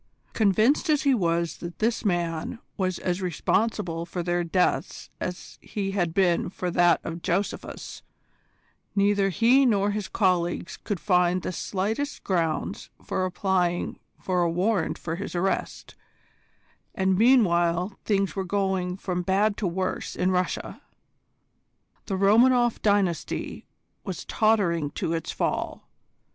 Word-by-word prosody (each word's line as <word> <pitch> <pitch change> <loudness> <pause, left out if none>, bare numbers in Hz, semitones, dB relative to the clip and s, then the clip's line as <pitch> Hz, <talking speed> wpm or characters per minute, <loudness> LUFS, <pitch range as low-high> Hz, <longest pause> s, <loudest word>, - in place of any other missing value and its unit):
Convinced 220 - +3
as 300 -2 +3
he 280 -2 +4
was 170 - 0
that 170 0 -8
this 225 +1 0
man 175 0 -1 0.2
was 185 -3 -1
as 180 +1 -2
responsible 180 -1 0
for 175 +1 -4
their 175 0 0
deaths 170 -2 -1
as 180 0 -6
he 195 -2 -3
had 175 -4 0
been 175 -1 +2
for 180 -1 -4
that 175 0 +4
of 165 +1 -5
Josephus, 190 +3 -3 0.9
neither 200 0 +3
he 235 +8 +4
nor 205 -5 +2
his 210 -1 -3
colleagues 180 -2 0
could 205 -4 -4
find 180 +2 +2
the - - -2
slightest 215 - -3
grounds 165 -5 -1
for 185 - -1
applying 180 -1 0 0.2
for 180 -1 0
a 170 - +2
warrant 180 +1 0
for 165 0 -4
his 195 -1 -6
arrest, 190 +2 -2 1.0
and 190 0 +2
meanwhile 185 -5 +3
things 195 -2 0
were 195 - -1
going 190 -1 -1
from 180 -2 -2
bad 200 +4 +2
to 205 - -1
worse 185 +2 -3
in 185 +1 +1
Russia. 180 0 -2 1.3
The 195 - -1
Romanoff 240 +4 +4
dynasty 200 -5 0 0.4
was 185 -4 -5
tottering 190 -9 +2
to 165 - -2
its 165 -1 -3
fall. - - -2
185 Hz, 130 wpm, -26 LUFS, 175-205 Hz, 1.3 s, he